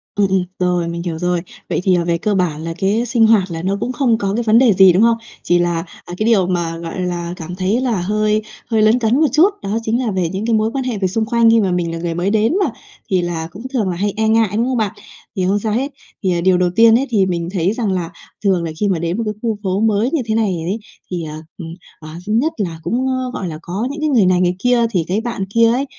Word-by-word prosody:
Ừm, 205 -1 +2
ừm, 190 -1 +1 0.2
rồi, 180 -2 +1
mình 170 0 -4
hiểu 170 -3 -3
rồi. 175 0 0 0.3
Vậy - - -1
thì, 185 -1 +3
ờ, 170 -1 0
về 170 -1 +1
cơ 205 +4 -1
bản 165 -5 -1
là 165 0 -4
cái 210 +4 +1
sinh 235 -3 +3
hoạt 200 -5 +3
là 165 -1 -4
nó 195 +3 -1
cũng 250 - -2
không 250 -3 +1
có 200 -3 -2
cái 235 +3 -1
vấn 220 0 +4
đề 240 -3 +5
gì, 190 -1 +6
đúng 190 +5 +4
không? 230 0 +4 0.3
Chỉ 175 0 +2
là, 175 -1 +1 0.3
à, 175 - -8
cái 215 - -1
điều 210 -6 +3
mà, 170 -2 -1
gọi 165 +2 -6
là, 175 -1 -3
cảm 175 0 -7
thấy 195 +6 0
là 235 -8 0
hơi 215 +3 +1 0.3
hơi 220 -2 +1
lấn 215 +3 +4
cấn 240 +5 +2
một 315 - +5
chút, 315 +8 +5
đó 200 +3 -1
chính 225 +2 0
là 220 - -1
về 185 -3 -1
những 195 +5 -4
cái 230 - +1
mối 220 0 +2
quan 270 -1 -1
hệ 250 -4 -2
về 195 -1 0
xung 220 +4 -1
quanh 230 0 +3
khi 225 0 +5
mà 190 -3 0
mình 175 -2 -1
là 165 - -4
người 170 0 -3
mới 175 +3 -1
đến 220 +5 +2
mà, 325 - +1 0.4
thì 185 -2 +2
là 170 -2 -3
cũng 200 - -10
thường 220 -7 0
là 180 - -2
hay 200 +3 -1
e 220 0 +1
ngại, 220 -1 +3
đúng 230 - +2
không 255 0 -1
bạn? 215 -3 0 0.4
Thì 185 - 0
không 200 +2 +2
sao 215 0 -2
hết, 270 +6 -1 0.3
thì, 190 - +2
à, 170 -1 0
điều 185 0 +3
đầu 180 0 +2
tiên 225 +1 +6
ấy 275 - -2
thì 205 -5 +2
mình 170 -2 -2
thấy 185 +1 +1
rằng 225 -4 -1
là 175 -3 -2 0.3
thường 190 -4 +2
là 165 - -3
khi 210 - +1
mà 185 -4 0
đến 170 +3 -2
một 230 - -1
cái 210 - -2
khu 225 -3 -1
phố 190 0 0
mới 220 +1 +2
như 320 - 0
thế 220 -1 -1
này 215 -5 +1
ấy 210 +4 -2 0.3
thì, 175 -2 -3
ờ, 155 0 -7 0.2
ừm, 170 - -7 0.3
ờ, 155 - -10 0.2
thứ 210 - -1
nhất 275 +9 +1
là 170 -7 -3
cũng, 240 +10 -1
ơ, 255 -1 -2
gọi 195 - -4
là, 155 -2 -6
có 190 +8 -3
những 300 +1 -6
cái 310 - +1
người 235 -9 +4
này 180 0 +3
người 180 0 +1
kia. 245 +1 +3
Thì 180 -6 +1
cái 195 +4 0
bạn 230 -5 -3
kia 230 0 +5
ấy, 260 +4 0
200 Hz, 295 wpm, -18 LUFS, 175-225 Hz, 0.4 s, gì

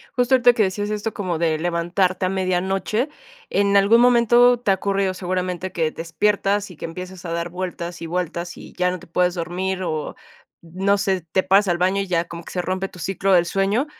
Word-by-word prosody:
Justo 250 +1 +3
ahorita 245 -1 +5
que 225 - +2
decías 205 +2 -2
esto 215 +1 -3
como 180 -5 -2
de 160 -1 +1
levantarte 175 +2 0
a - - +1
medianoche, 190 - -1 0.4
¿en 200 0 +2
algún 210 +4 +5
momento 245 0 +5
te 205 -5 +1
ha - - +4
ocurrido 195 0 0
seguramente 185 0 -3
que 160 -2 -1
despiertas, 200 +4 0
y 170 - -13
que - - -6
empieces 180 +2 -8
a 170 - -4
dar 170 +1 -2
vueltas 175 -1 -5
y 165 - -4
vueltas, 175 0 -3
y - - -12
ya 180 0 +1
no 185 - -5
te - - -15
puedes 180 +1 +1
dormir?, 185 +2 -3
o 155 -3 -3 0.5
no 190 +4 0
sé, 195 -2 0
te 190 - +2
paras 200 +2 +4
al 175 -1 +1
baño, 185 +3 +1
y 195 - -4
ya 170 -1 0
como 170 0 -9
que - - -11
se 180 - -1
rompe 185 +1 -2
tu - - -15
ciclo 195 +2 -1
del 175 -1 +5
sueño, 195 - 0
185 Hz, 215 wpm, -22 LUFS, 175-200 Hz, 0.5 s, ahorita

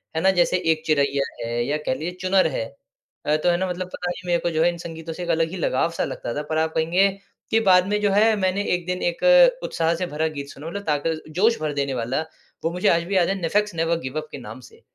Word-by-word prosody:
है 160 - 0
ना 190 - +5
जैसे 180 0 +2
एक 155 -1 0
चिरैया 140 -2 +2 0.2
है, 120 0 -1
या 145 +4 0
कह 150 -3 -2
लीजिए 160 +6 -4
चुनर 185 -1 +3
है 115 - -2 0.6
अ, 150 - +2
तो 155 - +1
है 175 - +3
ना 190 +1 -1
मतलब 180 0 -4
पता 180 - -3
नहीं 180 0 -8
मेरे 175 -1 +2
को 175 - -1
जो 160 0 +2
है 175 - +4
इन 170 - -8
संगीतों 165 -1 -7
से 180 - -6
एक 175 - -6
अलग 165 -1 +2
ही - - -5
लगाव-सा 165 +1 0
लगता 120 - -4
था। 150 - -1
पर 155 - 0
आप 160 0 0
कहेंगे, 170 +5 +3 0.4
कि 225 - +4
बाद 185 -2 +5
में 210 +1 0
जो 205 - +3
है 215 +3 +4
मैंने 195 0 0
1 175 -1 -1
दिन 180 +1 -3
एक 175 - -7 0.4
उत्साह 165 0 0
से 180 +2 -2
भरा 160 -1 -1
गीत 140 -3 -6
सुना 145 +3 -9
मतलब 200 +4 -5
ताक़त-जोश 160 +8 0
भर 155 -1 -2
देने 140 -1 -1
वाला, 125 +2 -1 0.4
वो 165 - 0
मुझे 180 +1 -1
आज 170 0 +3
भी 190 +3 -3
याद 180 -2 +4
है, 195 - 0
नेफेक्स 210 +4 +1
नेवर 165 0 0
गिव 130 0 -5
अप 155 - -13
के - - -6
नाम - - -9
से। 450 +1 -17
170 Hz, 265 wpm, -23 LUFS, 155-185 Hz, 0.6 s, ना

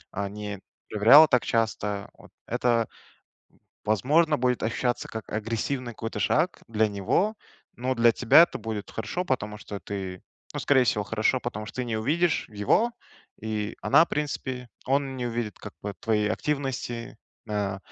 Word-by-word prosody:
э, 100 0 -2
не 105 -1 -6 0.3
проверяла 120 +9 +8
так 125 -4 +3
часто. 105 -3 -1
Вот - - -16 0.2
это, 120 -2 +1 1.0
в - - -12
возможно, 150 - +3
будет 125 0 +1
ощущаться 120 +2 -1
как 110 -2 -7
агрессивный 115 +3 -2
какой-то 115 -1 -5
шаг 170 - +1
для 110 -1 +2
него, 105 - 0 0.4
но 130 +2 -1
для 115 0 +5
тебя 125 +9 +7
это - - 0
будет 110 -2 -5
хорошо, 110 - -3
потому 105 - -2
что 105 -2 -7
ты 95 -3 -6 0.3
ну, - - -2
скорее 130 -3 +4
всего, 105 -3 +1
хорошо, 110 +4 +1
потому 110 -3 -5
что - - -10
ты 125 - -1
не 115 -2 -2
увидишь 155 +9 +1
его, 110 - +1 0.5
и 110 -1 -3
она, 155 +5 +6
в - - -21
принципе 130 -4 -3 0.2
он 135 0 0
не 125 - -2
увидит 115 -2 -3
как 105 - -9
бы 100 0 -3
твоей 105 -2 +1
активности, 130 -5 -3 0.3
э, 100 -2 -1
115 Hz, 160 wpm, -26 LUFS, 105-130 Hz, 1.0 s, проверяла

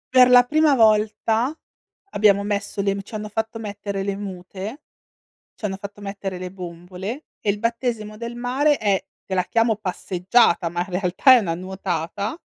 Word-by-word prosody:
Per 250 -1 +8
la 250 0 +8
prima 300 +2 +3
volta 220 +2 +3 0.6
abbiamo 200 -1 +4
messo 200 -1 -2
le 195 0 +1
v 200 - -4
c'hanno 210 +1 -7
fatto 220 +2 -3
mettere 200 -2 -4
le 200 0 -2
mute, 195 - -7 0.7
c'hanno 205 -3 -3
fatto 200 +1 -9
mettere 195 -2 -5
le 180 +1 -7
bombole, 180 - -7 0.2
e 205 - -1
il 205 +1 0
battesimo 230 -2 -2
del 235 +2 -6
mare 270 +5 +2
è- 200 -3 0 0.2
te 190 - -4
la 180 - +2
chiamo 225 +1 +2
passeggiata, 185 -1 +1
ma 175 - -4
in 180 +1 -3
realtà 190 +8 +5
è - - +5
una 180 -7 -1
nuotata- 185 - -4
205 Hz, 165 wpm, -22 LUFS, 190-230 Hz, 0.7 s, Per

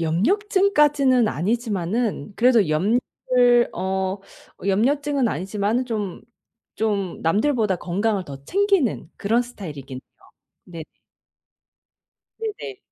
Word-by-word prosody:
염려증까지는 290 - +3
아니지만은 210 - -2
그래도 230 -8 +4
염려를 240 +6 +2
어 190 +1 -2 0.5
염려증은 275 +5 +1
아니지만은 205 - -1
좀 210 -6 -4 0.5
좀 200 -5 -1
남들보다 210 - +1
건강을 195 +3 -1
더 140 -3 -10
챙기는 390 - +1
그런 225 +4 +1
스타일이긴 150 - -8
해요. - - -26 0.4
네네. 165 -3 -8 1.6
네네. 425 -2 -6
220 Hz, 245 characters per minute, -22 LUFS, 185-255 Hz, 1.6 s, 그래도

